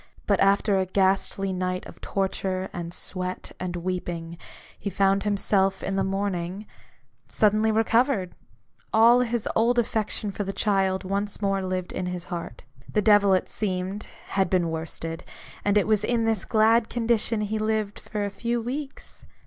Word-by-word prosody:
But 200 -2 +2
after 195 0 +3
a 190 - 0
ghastly 195 0 +1
night 185 0 -2
of - - -12
torture, 190 -1 -2
and 170 -1 -5
sweat, 185 +1 -4
and 180 -1 -3
weeping, 175 -1 -4 0.4
he 200 - -3
found 195 0 +2
himself, 195 -1 +1
in 195 - -2
the 195 - +1
morning, 195 0 -2 0.6
suddenly 215 +1 +3
recovered! 225 -3 +2 0.6
All 230 +2 +6
his 240 -2 0
old 235 +2 +3
affection 215 -2 0
for 205 - -3
the 195 0 -4
child 195 -2 +1
once 200 +2 -2
more 195 -1 0
lived 185 -1 -3
in 180 - -3
his 180 -1 -4
heart: 170 -8 -6 0.3
the 210 - +1
devil, 205 -2 +5
it 185 - -1
seemed, 190 0 -3 0.2
had 190 -2 +1
been 175 -3 +1
worsted: 165 +1 -5 0.4
and 205 0 +3
it 205 - +3
was 215 -1 +2
in 230 0 +1
this 225 -4 0
glad 225 +1 +3
condition 230 -2 +1
that - - 0
he 220 0 -1
lived 215 -1 -1
for 210 -1 -3
a 200 - -3
few 235 +3 -1
weeks. 270 +4 -7
195 Hz, 165 wpm, -26 LUFS, 185-215 Hz, 0.6 s, All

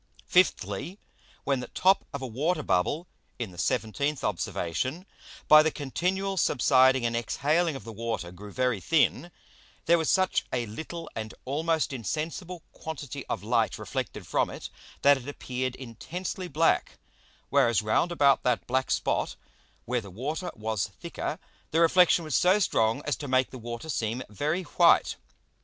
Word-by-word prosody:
Fifthly, 170 - +1 0.5
When 135 -2 +1
the 125 - -6
top 190 +1 +3
of 140 -3 -5
a - - -2
Water 150 +7 -1
Bubble 145 - +1 0.3
(in 115 -6 -4
the 90 - -14
17th 140 +10 -1
Observation,) 105 - -2 0.4
by 155 0 +9
the 160 - +2
continual 185 +7 -2
subsiding 130 -4 +4
and 115 0 0
exhaling 150 +7 +1
of 135 - -7
the 115 - -8
Water 110 -5 -4
grew 100 +3 -10
very 125 -2 0
thin, 165 - +2 0.6
there 170 0 +5
was 160 - 0
such 185 -1 +2
a 120 -2 -1
little 160 +9 -7
and 110 -1 -5
almost 155 +2 0
insensible 160 - -4
quantity 145 -3 -7
of 100 - -3
Light 115 0 +1
reflected - - -5
from - - +1
it, - - -8 0.3
that 140 0 +7
it 130 0 -10
appeared 130 -2 -3
intensely 170 - -6
black; 165 +1 +1 0.5
whereas 115 -2 +3
round 110 +11 +1
about 140 -5 +4
that 125 -2 0
black 130 +1 0
Spot, - - 0 0.5
where 125 0 -1
the 100 - -11
Water 145 - -4
was 110 -2 -2
thicker, - - -4 0.3
the 160 - +1
Reflexion 170 0 +5
was 155 - -1
so 185 +3 +5
strong 115 - +1
as 150 - 0
to 145 - -6
make 130 0 +2
the 130 - -8
Water 120 +5 -6
seem 120 -4 -2
very 150 - -1
white. - - +4
135 Hz, 155 wpm, -28 LUFS, 115-165 Hz, 0.6 s, by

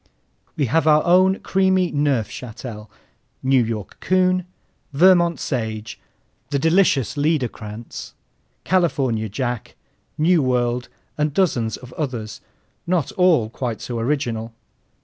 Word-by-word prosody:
We 145 - +2
have 160 +6 +1
our 150 0 +5
own 185 +2 +4
creamy 190 -2 +2
Neufchâtel, 120 -5 -3 0.6
New 130 -1 +4
York 110 -4 -5
Coon, 185 -1 +2 0.5
Vermont 170 +2 +4
Sage, 110 -4 -4 0.5
the 140 - 0
delicious 160 - +2
Liederkranz, 125 -7 -3 0.5
California 135 - +1
Jack, 120 +2 -4 0.4
Nuworld, 125 -7 +2 0.3
and 150 -1 0
dozens 120 -12 +1
of 125 -1 -13
others, 120 -8 -4 0.5
not 175 -5 0
all 175 - +3
quite 120 -3 -4
so 120 -2 -4
original. 115 -3 -2
135 Hz, 105 wpm, -21 LUFS, 115-170 Hz, 0.6 s, our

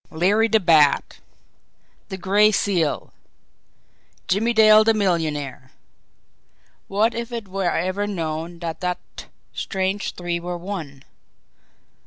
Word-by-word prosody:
Larry 200 +7 +2
the 220 -1 +3
Bat! 160 -6 +3 0.9
The 190 - -5
Gray 205 +3 +3
Seal! 180 -7 -1 1.1
Jimmie 220 +5 +1
Dale 215 -1 +6
the 225 0 +3
millionaire! 155 -9 -2 1.1
What 215 +4 +1
if 235 +1 -5
it 230 -4 -5
were 190 -1 -1
ever 185 +4 -1
known 165 -3 -4
that 165 -1 -5
that 180 -1 -2 0.5
strange 190 +1 -2
three 175 -1 -3
were 175 +1 -5
one! 170 -7 -7
185 Hz, 110 wpm, -22 LUFS, 170-210 Hz, 1.1 s, Dale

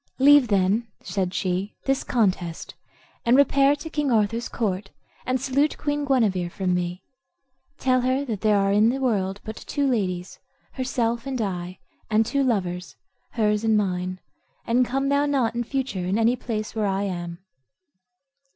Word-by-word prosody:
"Leave, 285 -1 +6
then," 200 +3 +2 0.2
said 185 -1 -2
she, 185 +2 -2
"this 270 0 +1
contest, 185 -8 -1 0.5
and 240 +2 +4
repair 280 0 +4
to 295 +3 -8
King 295 -4 -1
Arthur's 230 +1 +1
court, 195 -3 -2 0.4
and 255 0 +1
salute 280 +3 +1
Queen 290 -1 -1
Guenever 210 -10 +1
from 185 0 -1
me; 180 0 -2 0.7
tell 255 -1 +2
her 260 +3 0
that 220 -7 -4
there 215 -2 +3
are 195 0 +2
in 210 +3 +4
the 255 - 0
world 200 -6 0
but 220 - -6
two 285 +5 -2
ladies, 185 -8 -2 0.3
herself 240 -1 -1
and 265 -2 -3
I, 180 -3 -3 0.3
and 220 +1 +3
two 280 +5 0
lovers, 180 -7 -1 0.4
hers 210 -2 +1
and 220 -1 +3
mine; 185 -2 -1 0.5
and 245 +1 +2
come 270 +2 -1
thou 285 +1 +2
not 265 -6 +1
in 240 0 -1
future 250 -7 -3
in 190 +3 +1
any 230 +2 +3
place 220 -3 -4
where 215 -2 0
I 195 0 0
am." 175 -3 -4
220 Hz, 160 wpm, -24 LUFS, 190-260 Hz, 0.7 s, Leave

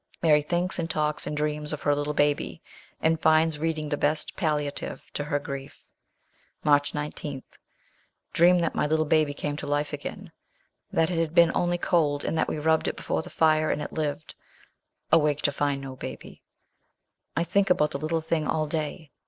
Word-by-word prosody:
Mary 150 -2 +5
thinks, 175 +4 0
and 165 -1 -2
talks, 150 -1 -1
and 150 - -3
dreams 150 0 -1
of 155 - -5
her 145 - +3
little 145 +1 -2
baby, 145 0 0 0.4
and 160 0 +2
finds 160 -1 +3
reading 155 -1 -1
the 145 - +1
best 150 +2 -1
palliative 150 -3 -2
to 145 - -2
her 145 -1 0
grief. 140 -1 -7 0.8
March 145 -1 +3
19. 150 -2 -4 0.9
Dream 175 +2 +6
that 165 - 0
my - - +1
little 155 +1 +2
baby 155 -1 +3
came 145 0 -3
to 145 - -5
life 145 +1 -1
again; 145 - -6 0.6
that 165 +1 +2
it 170 - 0 0.2
had 170 -1 +7
only 175 0 +1
been - - -5
cold, 150 -5 +2
and - - -1
that 160 - +1
we - - -2
rubbed 160 +1 +2
it - - -1
before - - -2
the - - -9
fire, 155 -1 +3
and - - 0
it 150 - -5
lived. 150 -1 -3 0.8
Awake 150 -2 +3
to 145 - +3
find 140 -1 -1
no 135 -1 -7
baby. - - -8 1.0
I 165 - +3
think 195 +3 +1
about 150 -4 +3
the 140 - -4
little 160 +2 -1
thing 160 -1 -1
all 155 -1 +1
day. 155 0 -4
150 Hz, 185 wpm, -26 LUFS, 145-160 Hz, 1.0 s, had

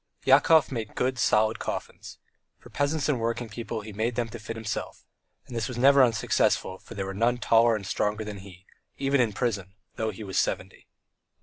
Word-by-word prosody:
Yakov 145 +4 +5
made 115 -4 -5
good, 130 -1 -1
solid 110 0 +2
coffins. - - -6 0.4
For - - -17
peasants 145 +1 0
and 145 -5 +1
working 115 +1 -2
people 115 +1 -5
he 105 0 -9
made 110 +3 -1
them 120 -1 -1
to 120 - -8
fit 110 +2 -6
himself, 110 -3 -5 0.4
and 120 - -9
this 115 -2 -1
was 125 - -6
never 135 +2 +6
unsuccessful, 105 -4 +1
for 115 - -12
there 100 -1 -3
were 95 - -5
none 115 +5 +1
taller 115 -1 +4
and 100 -2 -5
stronger 105 +3 -1
than 105 -2 -7
he, 95 -1 -14 0.3
even 135 -1 +2
in 120 - +2
the 100 - -12
prison, 100 -6 -2 0.2
though 110 0 -1
he 110 +1 -7
was 95 -2 -1
seventy. - - -3
115 Hz, 200 wpm, -27 LUFS, 105-125 Hz, 0.4 s, never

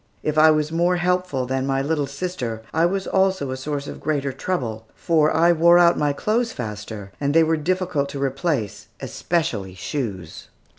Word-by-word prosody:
If 155 - -1
I 155 +1 +7
was 155 0 +1
more 175 +2 +2
helpful 180 -6 0
than 130 +1 -2
my 135 0 0
little 145 -1 -1
sister, 140 -7 -4
I 165 +1 +3
was 190 +1 -2
also 190 -7 +1
a - - -2
source 140 +1 -4
of - - -8
greater 145 -2 -1
trouble, 120 -8 -3
for 155 -2 +2
I 170 +2 +4
wore 170 +1 +5
out 175 -1 +5
my 145 -1 +1
clothes 230 +10 0
faster, 105 -3 -6
and 140 +1 0
they 165 - +7
were 160 0 +2
difficult 160 -3 -1
to 140 - -6
replace, 135 - -2
especially 105 - -2
shoes. 95 - -5
150 Hz, 180 wpm, -22 LUFS, 130-175 Hz, -, I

